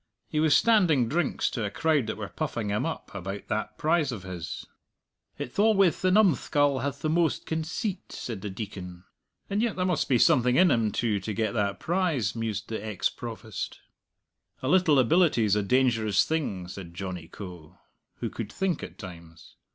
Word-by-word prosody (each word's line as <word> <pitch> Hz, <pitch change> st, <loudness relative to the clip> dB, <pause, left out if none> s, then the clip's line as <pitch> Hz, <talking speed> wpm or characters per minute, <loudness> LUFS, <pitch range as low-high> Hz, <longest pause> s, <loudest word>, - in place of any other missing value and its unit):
"He 150 Hz, -, -1 dB
was 155 Hz, -2 st, +5 dB
standing 180 Hz, -, +4 dB
drinks 155 Hz, +4 st, 0 dB
to 115 Hz, -, -3 dB
a 105 Hz, -, -1 dB
crowd 150 Hz, +1 st, +1 dB
that 110 Hz, -, -3 dB
were 105 Hz, -2 st, -4 dB
puffing 120 Hz, -5 st, -3 dB
him 105 Hz, +1 st, 0 dB
up -, -, -6 dB
about 95 Hz, +3 st, -6 dB
that 110 Hz, 0 st, -2 dB
prize 155 Hz, -3 st, +2 dB
o' 115 Hz, -, -4 dB
his." 90 Hz, -3 st, -6 dB, 0.7 s
"It's 125 Hz, -, -5 dB
alwayth 200 Hz, -5 st, +4 dB
the 185 Hz, -, +3 dB
numskull 145 Hz, -, +3 dB
hath 140 Hz, +1 st, -4 dB
the -, -, +1 dB
most 165 Hz, -1 st, +1 dB
conceit," 165 Hz, +5 st, -3 dB
said 110 Hz, -6 st, -5 dB
the 105 Hz, -, -4 dB
Deacon. 95 Hz, -3 st, -7 dB, 0.4 s
"And 205 Hz, +1 st, 0 dB
yet 235 Hz, -2 st, 0 dB
there 185 Hz, -, 0 dB
must 180 Hz, -4 st, 0 dB
be 130 Hz, -, +4 dB
something 125 Hz, +1 st, +4 dB
in 180 Hz, +1 st, +6 dB
him 115 Hz, -4 st, +2 dB
too, 110 Hz, -3 st, 0 dB
to 105 Hz, +3 st, -4 dB
get 110 Hz, -1 st, 0 dB
that 100 Hz, -3 st, -1 dB
prize," 160 Hz, -, 0 dB
mused 110 Hz, -2 st, -3 dB
the 110 Hz, -2 st, -4 dB
ex 105 Hz, -4 st, -1 dB
Provost. 110 Hz, -3 st, -6 dB, 0.9 s
"A -, -, -1 dB
little 175 Hz, -2 st, +4 dB
ability's 130 Hz, -, +4 dB
a 105 Hz, -, +2 dB
dangerous 115 Hz, -2 st, +2 dB
thing," 120 Hz, -, -2 dB
said 90 Hz, -2 st, -9 dB
Johnny 90 Hz, -3 st, -5 dB
Coe, 90 Hz, -6 st, -10 dB, 0.4 s
who -, -, -4 dB
could 115 Hz, -3 st, -5 dB
think 190 Hz, -3 st, -1 dB
at -, -, -8 dB
times. 85 Hz, -3 st, -11 dB
120 Hz, 180 wpm, -27 LUFS, 100-160 Hz, 0.9 s, in